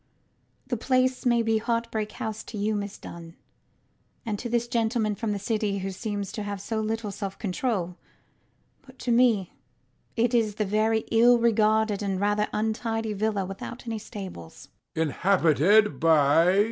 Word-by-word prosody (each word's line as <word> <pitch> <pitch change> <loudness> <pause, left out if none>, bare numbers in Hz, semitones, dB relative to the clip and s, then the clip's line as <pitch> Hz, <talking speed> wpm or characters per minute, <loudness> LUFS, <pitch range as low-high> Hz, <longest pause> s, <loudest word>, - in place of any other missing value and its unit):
The 245 - -2
place 255 +2 +1
may 235 -1 +3
be 225 -1 +2
Heartbreak 230 -2 -2
House 220 0 -5
to 220 - -8
you, 210 +2 0
Miss 205 -1 -4
Dunn, 165 0 -10 0.9
and 210 -3 -2
to 240 - -4
this 235 0 0
gentleman 225 -2 0
from 220 +1 -3
the 205 - -1
city 205 0 -1
who 195 0 -3
seems 205 0 -4
to 215 - -5
have 205 -1 -4
so 220 +3 -3
little 220 -1 -2
self 195 -1 -5
control; 185 -3 -2 0.8
but 260 -1 -18
to 245 - -2
me 230 -6 +3 0.6
it 235 +2 +1
is 220 -4 +2
only 215 - 0
a - - -6
very 215 +2 +2
ill 240 +2 +6
regulated 220 -2 +2
and 195 -2 -1
rather 205 +1 +1
untidy 220 0 -1
villa 205 -1 -1
without 195 +6 -8
any 225 -2 -3
stables. 190 - -9
220 Hz, 150 wpm, -26 LUFS, 205-230 Hz, 0.9 s, ill